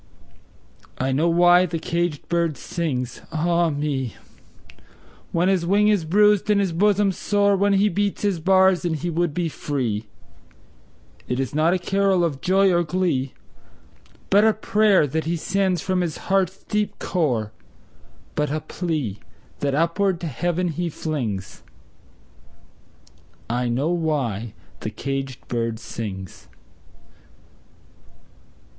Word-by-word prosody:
I 130 Hz, +1 st, -1 dB
know 155 Hz, +6 st, +2 dB
why 175 Hz, +2 st, +5 dB
the 165 Hz, 0 st, -3 dB
caged 170 Hz, -2 st, -2 dB
bird 170 Hz, -4 st, 0 dB
sings, 130 Hz, -6 st, -3 dB
ah 170 Hz, +1 st, +1 dB
me, 145 Hz, -4 st, -2 dB, 1.2 s
When 170 Hz, +2 st, +1 dB
his 190 Hz, -3 st, +2 dB
wing 205 Hz, +4 st, +3 dB
is 200 Hz, -6 st, +2 dB
bruised 205 Hz, +4 st, +3 dB
and 210 Hz, -1 st, +4 dB
his 195 Hz, -3 st, +1 dB
bosom 205 Hz, +2 st, +3 dB
sore, 200 Hz, +1 st, +1 dB
When 200 Hz, +1 st, +2 dB
he 200 Hz, +1 st, +4 dB
beats 205 Hz, +1 st, -1 dB
his 200 Hz, -4 st, +1 dB
bars 190 Hz, +1 st, +4 dB
and 170 Hz, -2 st, 0 dB
he 175 Hz, +3 st, -3 dB
would 170 Hz, 0 st, 0 dB
be 175 Hz, -2 st, 0 dB
free; 120 Hz, -9 st, -3 dB, 1.2 s
It 125 Hz, -, -2 dB
is 135 Hz, -1 st, -2 dB
not 160 Hz, +4 st, +3 dB
a -, -, +2 dB
carol 195 Hz, 0 st, +1 dB
of 145 Hz, -6 st, -2 dB
joy 190 Hz, 0 st, +3 dB
or 175 Hz, -, +3 dB
glee, 160 Hz, -6 st, -1 dB, 1.0 s
But 200 Hz, +2 st, +6 dB
a 220 Hz, 0 st, +5 dB
prayer 210 Hz, -5 st, +3 dB
that 155 Hz, +3 st, -2 dB
he 170 Hz, +2 st, 0 dB
sends 185 Hz, 0 st, 0 dB
from 185 Hz, -1 st, 0 dB
his 170 Hz, -4 st, -2 dB
heart's 190 Hz, -1 st, +1 dB
deep 210 Hz, 0 st, -2 dB
core, 125 Hz, -, -1 dB, 0.8 s
But 150 Hz, -1 st, 0 dB
a 155 Hz, +2 st, -2 dB
plea, 150 Hz, -, -3 dB, 0.4 s
that 140 Hz, -1 st, 0 dB
upward 170 Hz, +3 st, +1 dB
to 170 Hz, -, -3 dB
Heaven 175 Hz, +6 st, -1 dB
he 170 Hz, +2 st, -2 dB
flings 120 Hz, -, -4 dB, 1.9 s
I 120 Hz, +1 st, -1 dB
know 130 Hz, +7 st, 0 dB
why 135 Hz, -, -1 dB, 0.2 s
the -, -, -4 dB
caged 135 Hz, -1 st, -5 dB
bird 115 Hz, -1 st, -2 dB
sings! 95 Hz, -5 st, -7 dB
170 Hz, 135 wpm, -23 LUFS, 140-190 Hz, 1.9 s, But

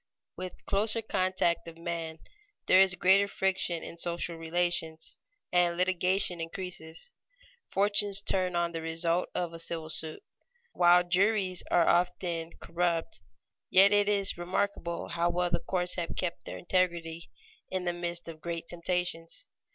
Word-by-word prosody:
_ -, -, -55 dB, 0.3 s
With 185 Hz, -1 st, -8 dB
closer 215 Hz, +3 st, +1 dB
contact 185 Hz, -4 st, 0 dB
of 165 Hz, 0 st, -9 dB
men 165 Hz, -1 st, -4 dB, 0.5 s
there 185 Hz, -, +7 dB
is 190 Hz, -2 st, +4 dB
greater 195 Hz, +3 st, +4 dB
friction 190 Hz, -4 st, -1 dB
in 170 Hz, -, -8 dB
social 170 Hz, 0 st, 0 dB
relations, 165 Hz, -1 st, -2 dB, 0.3 s
and 175 Hz, -1 st, +3 dB
litigation 180 Hz, -1 st, +1 dB
increases. 165 Hz, -, -6 dB, 0.6 s
Fortunes 205 Hz, 0 st, +2 dB
turn 185 Hz, -2 st, 0 dB
on 170 Hz, 0 st, +1 dB
the 165 Hz, -1 st, -4 dB
result 165 Hz, +2 st, 0 dB
of 175 Hz, -2 st, -2 dB
a 165 Hz, -, -8 dB
civil 165 Hz, -1 st, -2 dB
suit. 155 Hz, 0 st, -4 dB, 0.5 s
While 175 Hz, 0 st, +6 dB
juries 185 Hz, +1 st, +2 dB
often 175 Hz, -1 st, +2 dB
are -, -, -18 dB
corrupt, 170 Hz, 0 st, -1 dB, 0.5 s
yet 195 Hz, +2 st, +7 dB
it 205 Hz, 0 st, +4 dB
is 200 Hz, -3 st, +1 dB
remarkable 175 Hz, -1 st, -2 dB
how 170 Hz, 0 st, +1 dB
well 175 Hz, 0 st, 0 dB
the 170 Hz, -, +2 dB
courts 180 Hz, -1 st, 0 dB
have 170 Hz, -2 st, -3 dB
kept 170 Hz, -7 st, -3 dB
their -, -, -6 dB
integrity 170 Hz, -2 st, -1 dB, 0.4 s
in 185 Hz, -1 st, -2 dB
the 175 Hz, -, 0 dB
midst 175 Hz, 0 st, -3 dB
of 160 Hz, -1 st, -9 dB
great 170 Hz, 0 st, -4 dB
temptations. 175 Hz, -, -2 dB
175 Hz, 145 wpm, -30 LUFS, 170-185 Hz, 0.6 s, there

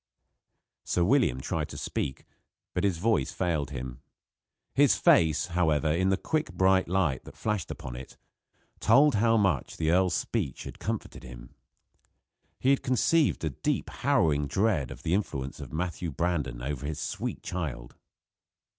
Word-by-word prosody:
Sir 90 Hz, -, +1 dB
William 110 Hz, -, +3 dB
tried -, -, -3 dB
to -, -, -8 dB
speak, 65 Hz, -, -3 dB, 0.5 s
but -, -, -1 dB
his 95 Hz, -4 st, +1 dB
voice 100 Hz, -6 st, +1 dB
failed 80 Hz, -5 st, -1 dB
him. 65 Hz, -2 st, -6 dB, 0.7 s
His -, -, +5 dB
face, 80 Hz, -3 st, +4 dB
however, 80 Hz, -3 st, +2 dB
in 95 Hz, +4 st, +2 dB
the 95 Hz, -, +2 dB
quick 155 Hz, +6 st, -1 dB
bright 95 Hz, 0 st, +3 dB
light 85 Hz, -7 st, 0 dB
that -, -, -12 dB
flashed 105 Hz, -5 st, -2 dB
upon 60 Hz, -2 st, -7 dB
it, 65 Hz, +1 st, -10 dB, 0.6 s
told 140 Hz, +6 st, +5 dB
how 115 Hz, +2 st, +3 dB
much 95 Hz, -, 0 dB
the 80 Hz, 0 st, +1 dB
earl's 90 Hz, -1 st, +3 dB
speech 95 Hz, -, -2 dB
had -, -, -9 dB
comforted -, -, -4 dB
him. -, -, -11 dB, 1.1 s
He 130 Hz, -, +3 dB
had 140 Hz, -, +2 dB
conceived 140 Hz, -, +2 dB
a 80 Hz, -, 0 dB
deep, 65 Hz, -, -2 dB
harrowing 75 Hz, -2 st, +1 dB
dread 85 Hz, -, +1 dB
of -, -, -10 dB
the 80 Hz, -, 0 dB
influence 70 Hz, -9 st, -2 dB
of -, -, -8 dB
Matthew 85 Hz, +1 st, -3 dB
Brandon 75 Hz, -7 st, -2 dB
over 70 Hz, +1 st, -3 dB
his 80 Hz, 0 st, -4 dB
sweet -, -, -4 dB
child. 75 Hz, -9 st, -5 dB
85 Hz, 155 wpm, -28 LUFS, 70-95 Hz, 1.1 s, His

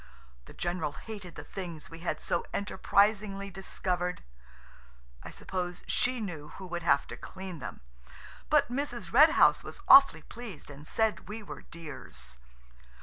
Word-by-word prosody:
The -, -, -13 dB
general 175 Hz, -4 st, -2 dB
hated 195 Hz, +2 st, -9 dB
the -, -, -7 dB
things 170 Hz, -6 st, -7 dB
we 165 Hz, -, -9 dB
had 170 Hz, -, -2 dB
so 175 Hz, -, -1 dB
enterprisingly 200 Hz, -1 st, +1 dB
discovered. 180 Hz, -1 st, -2 dB, 1.0 s
I -, -, -8 dB
suppose 180 Hz, -1 st, -4 dB
she 250 Hz, 0 st, +1 dB
knew 170 Hz, -9 st, -5 dB
who 190 Hz, -, -7 dB
would 175 Hz, -1 st, -4 dB
have 140 Hz, -4 st, +3 dB
to -, -, -7 dB
clean 185 Hz, -3 st, -8 dB
them, -, -, -7 dB, 0.7 s
but 295 Hz, -5 st, +4 dB
Mrs. 240 Hz, -8 st, -3 dB
Red 300 Hz, +6 st, +9 dB
House -, -, +6 dB
was -, -, -8 dB
awfully 275 Hz, 0 st, +8 dB
pleased 220 Hz, -12 st, -9 dB
and 145 Hz, +2 st, -10 dB
said 220 Hz, -3 st, 0 dB
we 215 Hz, +1 st, -6 dB
were -, -, -8 dB
dears. 70 Hz, -, -9 dB
185 Hz, 145 wpm, -30 LUFS, 170-215 Hz, 1.0 s, Red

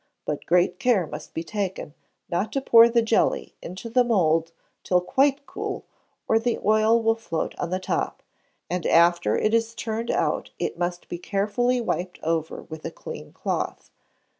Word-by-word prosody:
but 150 Hz, -, -4 dB
great 175 Hz, +7 st, +3 dB
care 245 Hz, -9 st, +3 dB
must -, -, -8 dB
be 165 Hz, -, -4 dB
taken 190 Hz, -4 st, -4 dB, 0.3 s
not 185 Hz, +5 st, -1 dB
to 275 Hz, -, 0 dB
pour 235 Hz, -3 st, +7 dB
the 235 Hz, 0 st, +3 dB
jelly 225 Hz, 0 st, +1 dB
into 185 Hz, +6 st, -7 dB
the 245 Hz, +2 st, +3 dB
mould 165 Hz, -8 st, +2 dB, 0.3 s
till 180 Hz, -, +3 dB
quite 275 Hz, +9 st, +1 dB
cool, -, -, -5 dB, 0.4 s
or 225 Hz, -, +4 dB
the 235 Hz, +1 st, 0 dB
oil 215 Hz, +2 st, +4 dB
will 225 Hz, 0 st, +3 dB
float 175 Hz, -8 st, -3 dB
on 170 Hz, -, -2 dB
the 185 Hz, -, 0 dB
top, 185 Hz, -, -2 dB, 0.4 s
and 180 Hz, -1 st, -2 dB
after 170 Hz, -10 st, +4 dB
it 215 Hz, -, +1 dB
is 230 Hz, 0 st, +1 dB
turned 230 Hz, +1 st, -3 dB
out -, -, 0 dB
it -, -, -2 dB
must 175 Hz, 0 st, -3 dB
be 175 Hz, -, -5 dB
carefully 215 Hz, +7 st, 0 dB
wiped 185 Hz, -6 st, -2 dB
over 160 Hz, -1 st, -2 dB
with 160 Hz, -1 st, -9 dB
a -, -, -3 dB
clean -, -, -9 dB
cloth. -, -, -3 dB
205 Hz, 170 wpm, -25 LUFS, 175-230 Hz, 0.4 s, pour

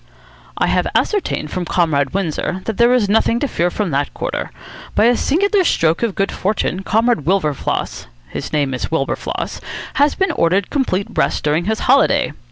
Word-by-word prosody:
"I -, -, +2 dB
have -, -, +1 dB
ascertained 385 Hz, -, 0 dB
from 180 Hz, -, -2 dB
Comrade 150 Hz, -6 st, +1 dB
Windsor 185 Hz, 0 st, -2 dB
that 225 Hz, -, -3 dB
there 235 Hz, +1 st, +5 dB
is 250 Hz, -5 st, +3 dB
nothing 225 Hz, +3 st, +2 dB
to 285 Hz, -, 0 dB
fear 175 Hz, -7 st, 0 dB
from 195 Hz, -1 st, -2 dB
that 140 Hz, +1 st, 0 dB
quarter. -, -, -3 dB, 0.5 s
By 215 Hz, -, +4 dB
a 240 Hz, +1 st, +5 dB
singular 390 Hz, -, +2 dB
stroke 165 Hz, -, +2 dB
of 230 Hz, -5 st, -1 dB
good 195 Hz, -, 0 dB
fortune 195 Hz, -2 st, -1 dB
Comrade 225 Hz, -, +1 dB
Wilberfloss 160 Hz, -, -1 dB, 0.2 s
his -, -, -6 dB
name 145 Hz, -3 st, 0 dB
is 125 Hz, -, -3 dB
Wilberfloss 150 Hz, -4 st, -3 dB, 0.3 s
has 290 Hz, +1 st, +2 dB
been 385 Hz, 0 st, +1 dB
ordered 180 Hz, +3 st, +1 dB
complete 200 Hz, -9 st, 0 dB
rest -, -, 0 dB
during 155 Hz, +3 st, +1 dB
his 220 Hz, +2 st, -1 dB
holiday. 275 Hz, +2 st, +3 dB
195 Hz, 175 wpm, -18 LUFS, 160-235 Hz, 0.5 s, there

